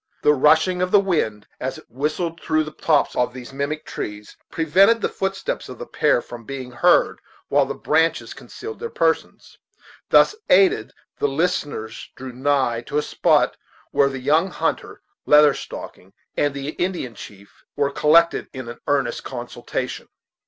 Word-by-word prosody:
The 150 - +5
rushing 160 +6 +3
of 180 - +1
the 205 - +6
wind, 150 - -1
as - - -4
it - - -14
whistled 155 +6 -3
through 155 -1 +1
the 155 - -8
tops 150 -1 +1
of 125 0 0
these 125 +1 -9
mimic 140 +3 -3
trees, 105 0 -7
prevented 190 +8 +4
the - - -1
footsteps 195 0 -3
of 125 - -8
the 120 - -7
pair 150 -4 +1
from 120 -1 -10
being 130 0 -7
heard, 120 - +3 0.3
while - - +3
the - - -4
branches 160 +2 +1
concealed 440 0 -9
their 465 +1 -4
persons. 465 +2 -2 0.5
Thus - - +5
aided, 185 - +4 0.3
the - - +2
listeners 140 -7 -2
drew 130 0 -8
nigh 130 -3 +1
to 145 - -2
a 150 - +1
spot - - +2 0.3
where 140 -1 +3
the 135 - -5
young 155 +8 +2
hunter, - - -3 0.2
Leather 150 -1 +7
Stocking, 95 -6 -9 0.2
and 145 -1 0
the 140 +1 -4
Indian 175 -7 -3
chief 100 -1 -13
were 140 -1 0
collected 165 +4 +3
in 130 -3 -7
an 120 - -9
earnest 145 -1 0
consultation. 120 -2 -5
145 Hz, 160 wpm, -22 LUFS, 125-165 Hz, 0.5 s, Leather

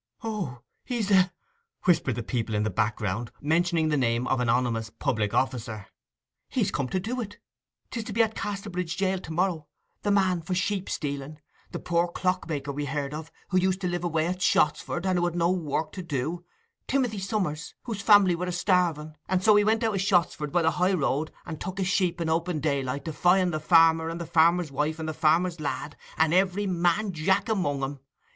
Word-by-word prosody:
'O, 190 - -4 0.2
he's 235 -5 -2
the—!' 185 -2 +5 0.5
whispered 165 - +2
the 120 - -4
people 115 -2 -2
in 105 - +1
the 110 - -1
background, 110 +2 -1
mentioning 165 +1 +1
the 150 - +2
name 120 -2 +1
of 130 - +1
an 125 -2 0
ominous 115 -2 +1
public 110 -1 -1
officer. 115 -5 -1 0.6
'He's - - 0
come 135 - -1
to 190 - 0
do 240 +7 -3
it! 205 -2 -7 0.5
'Tis 230 -3 -4
to 215 - -5
be 230 +2 +4
at 220 0 -1
Casterbridge 195 -5 -4
jail 190 -1 +1
to 165 - -9
morrow—the 175 +3 -3
man 190 -3 +2
for 180 +3 -3
sheep 195 +1 -1
stealing—the 145 +1 -6
poor 170 0 +1
clock 180 0 -1
maker 145 -2 -3
we 145 +1 -3
heard 140 0 -3
of; 160 +1 -7 0.2
who 185 - +3
used 185 0 +1
to 180 - 0
live 175 -1 -2
away 160 -2 0
at 180 +2 -3
Shottsford 170 +3 +1
and 180 -2 +1
had 175 -1 0
no 170 0 +2
work 155 -3 -2
to 190 - -6
do—Timothy 175 - -3
Summers, 190 -6 -3
whose 220 -5 -4
family 200 -3 +6
were 180 +2 -3
a - - -1
starving, 175 -4 +1 0.2
and 185 0 +1
so 215 0 +6
he 205 - +5
went 220 +2 +2
out 220 -1 +1
of 195 - 0
Shottsford 175 -6 +1
by 175 +1 +2
the 160 - +3
high 180 +4 +1
road, 155 -2 0
and 160 -3 -7
took 190 +2 -5
a - - +1
sheep 180 -2 +1
in 165 - -1
open 165 0 0
daylight, 140 -2 -1
defying 180 +3 +2
the 155 - -2
farmer 165 0 +5
and 165 +1 -5
the 170 - -4
farmer's 170 0 +3
wife 150 +3 -1
and 160 -1 -5
the 155 - -2
farmer's 165 +2 +2
lad, 145 0 -4 0.2
and 160 0 +3
every 190 +2 +2
man 180 +3 +1
jack 190 +4 +1
among 180 -11 0
'em. 135 +1 -4
170 Hz, 200 wpm, -27 LUFS, 150-185 Hz, 0.6 s, family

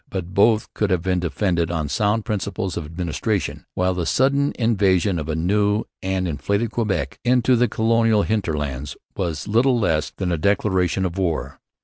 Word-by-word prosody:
But 95 -1 -5
both 110 +3 +3
could 105 - 0
have 90 -3 +1
been 90 -1 +1
defended 85 -1 0
on 80 -3 -2
sound 105 +6 0
principles 95 -3 -3
of 80 - -4
administration; 85 -1 -3
while 90 0 +1
the 90 -2 -2
sudden 140 +2 +2
invasion 100 -6 +2
of 75 0 -5
a 80 - -1
new 105 +5 +1 0.2
and 95 -1 -1
inflated 100 - -1
Quebec 110 -4 -2
into 125 +1 +3
the 125 +1 +3
colonial 110 -1 +2
hinterlands 75 -10 -2 0.2
was 85 -4 -3
little 120 +4 +3
less 80 -7 +1
than 90 -2 -3
a 85 - 0
declaration 95 -1 +1
of 90 +1 -3
war. 80 -8 -2
95 Hz, 165 wpm, -22 LUFS, 85-110 Hz, 0.2 s, both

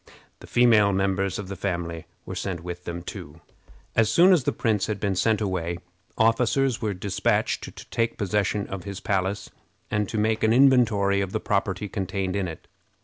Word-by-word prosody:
The - - -13
female 110 -4 +4
members 95 0 0
of 100 - -6
the 100 - -5
family 85 -3 -4 0.2
were - - -6
sent 90 -2 -4
with 90 0 -7
them 85 0 -5
too. - - -9 0.6
As 115 -2 +3
soon 180 +7 +6
as 155 -9 +2
the - - +2
prince 110 -4 0
had 105 -2 -3
been 100 -1 -1
sent 110 +3 +1
away, 90 -4 -2 0.4
officers 120 +3 +2
were 105 -3 -1
dispatched 95 +1 0
to - - -10
take 115 0 0
possession 100 0 0
of 95 -2 -6
his 100 0 -6
palace, 95 0 -2 0.4
and 105 -2 0
to 110 - -3
make 110 +1 +1
an 110 0 +4
inventory 115 -7 +4
of 95 -1 -3
the 110 - 0
property 100 -1 -1
contained 95 -1 -3
in 100 -2 -1
it. 80 - -9
100 Hz, 185 wpm, -25 LUFS, 95-110 Hz, 0.6 s, soon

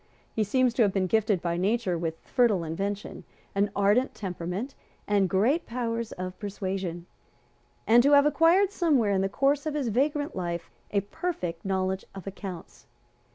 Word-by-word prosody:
He 220 - +1
seems 250 +3 +2
to 240 - +1
have 205 -3 +4
been 190 -1 0
gifted 210 -1 +1
by 170 -1 -1
nature 195 0 +1
with 165 -1 -3
fertile 225 -8 +2
invention, 195 +6 -4 0.3
an 200 +1 +1
ardent 205 +6 +2
temperament 190 +6 -4 0.3
and 200 -2 +2
great 235 - +2
powers 230 -1 -3
of 185 0 -6
persuasion, 190 -4 -4 0.8
and 235 +2 +6
to 285 +3 +4
have 285 0 +7
acquired 330 +7 +4
somewhere 290 - +2
in 190 -1 +2
the 195 - 0
course 280 +6 +1
of 300 - -2
his 275 -5 -1
vagrant 290 +5 0
life 170 -2 -4 0.2
a 200 - +1
perfect 195 - -4
knowledge 190 0 -1
of 195 - -8
accounts. 195 -3 -8
205 Hz, 160 wpm, -27 LUFS, 185-255 Hz, 0.8 s, have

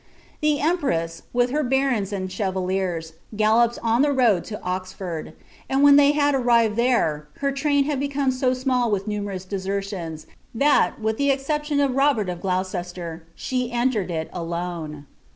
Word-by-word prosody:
The 300 -1 +2
empress, 170 - 0
with 245 0 +1
her 300 +2 +1
barons 260 -6 +1
and 190 -2 -3
chevaliers, 185 -4 -2 0.2
galloped 225 +3 +3
on 230 +2 +3
the 295 - +4
rnod 240 -10 +2
M 210 - -4
Oxford; 185 -3 -4 0.4
and 270 +1 +2
when 285 0 +8
they 285 0 +6
had 290 -1 +2
arrived 235 -4 +3
there, 215 -12 +1
her 280 0 0
train 285 0 +2
had 285 -1 -1
becomn 280 -1 0
mi 255 0 +1
nnill 255 -2 +1
with 200 0 -1
numerous 200 -3 -4
desertions, 190 -4 -4 0.3
that, 285 +1 +3
with 220 +3 -1
ihe 280 - +3
exception 295 +2 0
of 280 -2 +2
Robert 270 -7 +2
of 175 -1 -5
Gloo 185 -1 0
c«Bler, 175 -3 -6
she 250 -1 -2
entered 240 -5 0
it 160 -2 -3
alone. 170 -3 -5
220 Hz, 160 wpm, -23 LUFS, 185-270 Hz, 0.4 s, when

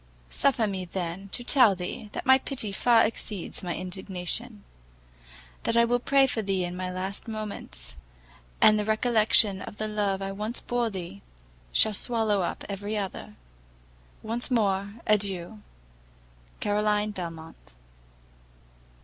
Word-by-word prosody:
Suffer 255 -5 +2
me, 195 -3 -3
then, 180 +2 -5
to 245 - -3
tell 240 -6 +5
thee, 180 +4 -6
that - - -5
my 265 +1 +7
pity 255 -7 -4
far 230 +3 +4
exceeds 210 -4 -3
my 175 -2 -3
indignation, 190 +4 -4 1.0
that 230 - 0
I 235 - +6
will 245 +1 +2
pray 275 +2 +4
for 245 -4 0
thee 195 -3 0
in 175 0 -4
my 185 0 -3
last 190 +4 -4
moments, 200 - -5 0.6
and 215 0 +6
that 210 - -1
the - - -4
recollection 215 -3 +3
of 205 - -8
the 215 - -2
love 205 -2 0
I 195 - -3
once 210 +4 -4
bore 240 -1 -1
thee, 175 - -7 0.5
shall 215 - +4
swallow 220 -2 +3
up 175 - -3
every 205 +2 -3
other! 190 - -5 0.9
Once 230 +2 -3
more, 200 -4 +1
adieu! 205 -1 0 1.0
CAROLINE 210 0 +1
BELMONT. 165 - -8
205 Hz, 140 wpm, -27 LUFS, 190-225 Hz, 1.0 s, my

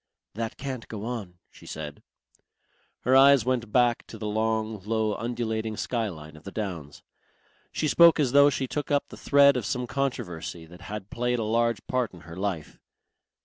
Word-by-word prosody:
"That 115 +1 -4
can't 130 -4 -5
go 110 -1 -6
on," 110 -7 -5 0.2
she - - -16
said. 75 -2 -7 1.0
Her 130 +2 +3
eyes 135 -3 +7
went 120 -4 -1
back 120 -1 +2
to - - -9
the 110 - -6
long, 110 0 -1
low, 110 0 0
undulating 110 -1 -3
skyline 85 -11 -3
of 75 - -14
the 100 - -8
downs. 85 -10 -5 0.7
She 155 - -1
spoke 170 +2 +6
as 135 -5 +2
though 140 +1 +7
she 135 -1 -1
took 145 +3 -4
up 145 -1 +1
the - - -10
thread 140 -1 +5
of 125 - -1
some 125 +4 -2
controversy 90 - -3
that 90 +3 -14
had 105 +1 -7
played 125 +1 0
a 115 - -1
large 115 -1 0
part 125 -5 -1
in 85 - -13
her 85 -1 -11
life. 95 -5 -4
110 Hz, 180 wpm, -27 LUFS, 100-125 Hz, 1.0 s, eyes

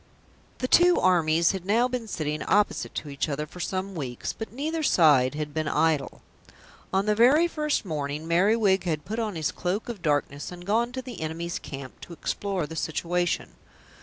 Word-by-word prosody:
The 255 - -2
two 350 +5 +5
armies 170 -2 +3
had 190 -2 -5
now 225 +6 +3
been 250 -2 -4
sitting 155 -5 -3
opposite 210 +1 +1
to 150 - -4
each 140 +2 -2
other 150 +1 -2
for 180 - -13
some 190 +3 -3
weeks, 130 -8 -4
but 220 - -7
neither 310 +6 -2
side 145 - +4
had 150 -1 -4
been 155 0 -1
idle. 150 -3 0 0.7
On 195 +1 +1
the 210 - +3
very 260 +10 +5
first 300 -7 -1
morning 150 -1 -3
Merriwig 190 +2 +3
had 155 -4 -2
put 220 +4 -3
on 215 -4 -2
his 155 -3 -1
Cloak 185 +6 -3
of 220 -6 -6
Darkness 145 -1 -1
and 175 0 -10
gone 230 +4 +1
to 260 0 -4
the 245 -9 -8
enemy's 165 +2 -3
camp 135 -2 -9
to 175 - -9
explore 190 0 -2
the 160 - -8
situation. 175 +2 -1
175 Hz, 185 wpm, -26 LUFS, 155-220 Hz, 0.7 s, two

